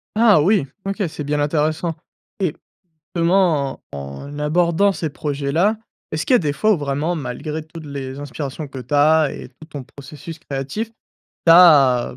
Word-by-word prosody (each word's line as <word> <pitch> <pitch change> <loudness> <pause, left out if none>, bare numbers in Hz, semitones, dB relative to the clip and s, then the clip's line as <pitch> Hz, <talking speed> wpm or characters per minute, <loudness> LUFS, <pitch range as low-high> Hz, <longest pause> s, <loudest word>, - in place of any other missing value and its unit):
Ah 215 -7 +5
oui, 185 -4 +2 0.2
OK. 195 +2 -3
C'est 155 -2 -6
bien 145 +1 -1
intéressant 155 +3 0 0.5
et 175 -5 +1 0.6
justement 170 -5 +1
en 70 - -8
abordant 170 +5 +2
ces 165 -4 -3
projets-là, 145 +9 0 0.3
est-ce 155 - -2
qu'il - - +2
y - - +8
a - - +5
des 150 -4 -1
fois 215 +8 +2
où - - 0
vraiment, 145 +4 -1
malgré 150 +2 -4
toutes 155 0 -11
les 140 -1 -6
inspirations 145 +1 -6
que 135 -1 -8
tu 125 +4 -7
as 150 0 +4
et - - -9
tout 135 +5 -15
ton 145 -3 -7
processus 150 +5 -11
créatif, 140 - -4 0.6
tu 165 - +8
as, 140 -8 +6
heu, - - -14
150 Hz, 175 wpm, -20 LUFS, 140-170 Hz, 0.6 s, y